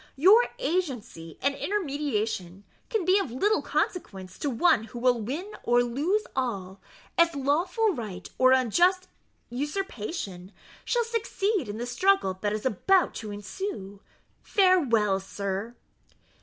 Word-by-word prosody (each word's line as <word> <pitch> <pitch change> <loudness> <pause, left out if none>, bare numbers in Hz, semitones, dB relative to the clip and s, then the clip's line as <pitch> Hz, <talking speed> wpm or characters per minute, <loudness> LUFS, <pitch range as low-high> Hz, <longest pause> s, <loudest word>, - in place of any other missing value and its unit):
Your 395 - +6
agency 265 - -3
and 280 +1 +2
intermediation 270 - -2 0.3
can 435 -6 -1
be 375 +3 +4
of 390 - -2
little 410 - +1
consequence 190 - -3
to 290 - -1
one 250 -3 +3
who 225 - -10
will 245 -1 +2
win 305 - -4
or 240 0 +3
lose 300 - 0
all, 200 -7 -3 0.4
as 335 -1 +4
lawful 335 - +1
right 210 - -6
or 255 0 +6
unjust 345 - +3 0.4
usurpation 245 - -4 0.3
shall 480 -1 +1
succeed 425 - -1
in 205 - -5
the 240 - -3
struggle 245 - +2
that 205 - 0
is 215 +2 -3
about 355 - +2
to 215 - -6
ensue. 205 - -6 0.4
Farewell, 250 - +3
sir." 200 +3 -4
260 Hz, 130 wpm, -27 LUFS, -, 0.4 s, Your